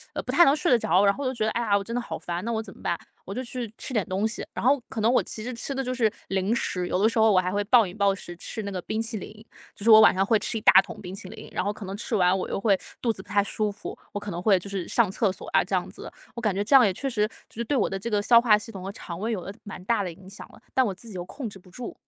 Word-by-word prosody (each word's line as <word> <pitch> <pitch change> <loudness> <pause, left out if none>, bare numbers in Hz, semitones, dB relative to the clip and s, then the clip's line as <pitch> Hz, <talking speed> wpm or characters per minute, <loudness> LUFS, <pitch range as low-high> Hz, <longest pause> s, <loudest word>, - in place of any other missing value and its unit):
呃， - - -1
不 - - -3
太 345 - +7
能 280 -1 +5
睡 310 -1 0
得 245 - +7
着， 185 +3 +3
然 200 - +5
后 280 - -6
我 255 - 0
就 - - -3
觉 215 -3 -1
得， 220 - 0
“哎 240 - -1
呀， 205 -3 +3
我 200 - -3
真 230 +4 -5
的 245 - 0
好 - - -5
烦， 175 +2 -4
那 235 - -2
我 220 -1 -1
怎 195 - -11
么 - - -17
办”。 170 - -1 0.3
我 195 - -6
就 250 - -3
去 240 -3 -5
吃 255 - -7
点 215 -4 +1
东 195 +4 0
西。 220 - -5
然 - - -4
后 270 0 +4
可 225 - -5
能 225 +3 +3
我 - - +3
其 220 - -7
实 250 - -4
吃 235 +4 -5
的 270 - -1
就 255 -1 -2
是 225 -4 +2 0.2
零 190 +3 0
食， 180 -6 -1
有 185 - 0
的 220 - +5
时 230 - -2
候 220 -1 +5
我 185 - +5
还 185 +1 -1
会 205 0 +1
暴 230 -3 +5
饮 180 - -9
暴 200 -2 +3
食 175 -3 -8
吃 215 +5 -6
那 200 - -4
个 185 -2 -4
冰 220 +5 -2
淇 225 -1 -5
淋。 215 +2 -8 0.3
就 205 - -9
是 - - +4
我 220 0 +10
晚 - - +7
上 190 +1 +1
会 220 +1 +4
吃 225 - -3
一 - - -5
大 - - +6
桶 210 - -10
冰 185 0 -7
淇 190 - -9
淋， 220 0 -10
然 - - -1
后 205 - 0
可 210 -1 -8
能 195 +1 -5
吃 225 +1 -3
完 180 +1 +3
我 - - -4
又 - - -2
会 200 -2 +3 0.2
肚 230 -2 +1
子 190 - -9
不 - - -23
太 205 0 +3
舒 210 +1 -2
服， 200 - -8
我 205 - -4
可 205 0 -7
能 175 -1 -4
会 195 -1 +4
就 200 - -9
是 195 -3 -3
上 230 -5 +3
厕 200 0 +1
所 - - -9
啊， - - +5
这 - - -7
样 - - 0
子。 - - -9 0.2
我 235 - -5
感 215 -4 +1
觉 195 - -1
这 275 - +4
样， 255 -4 +8
也 195 - +3
确 270 +9 -3
实 210 -4 +1 0.2
就 - - -13
是 - - 0
对 270 +4 0
我 210 - +1
的 195 - -3
这 215 +5 -5
个 205 -1 +1
消 235 +2 +6
化 220 -3 +5
系 225 +1 -9
统 190 -1 -7
和 195 - -4
肠 170 -4 -8
胃 220 +4 -2
有 210 - -1
了 195 - -7
蛮 200 -3 -8
大 230 -2 +1
的 180 - -4
影 190 +3 -14
响 200 - -10
了， - - -17
但 260 -1 +3
我 200 - -1
自 230 +5 -13
己 215 - -9
又 175 - -4
控 235 +5 -6
制 195 - -12
不 180 - -18
住。 240 +5 -7
210 Hz, 385 characters per minute, -26 LUFS, 195-230 Hz, 0.3 s, 我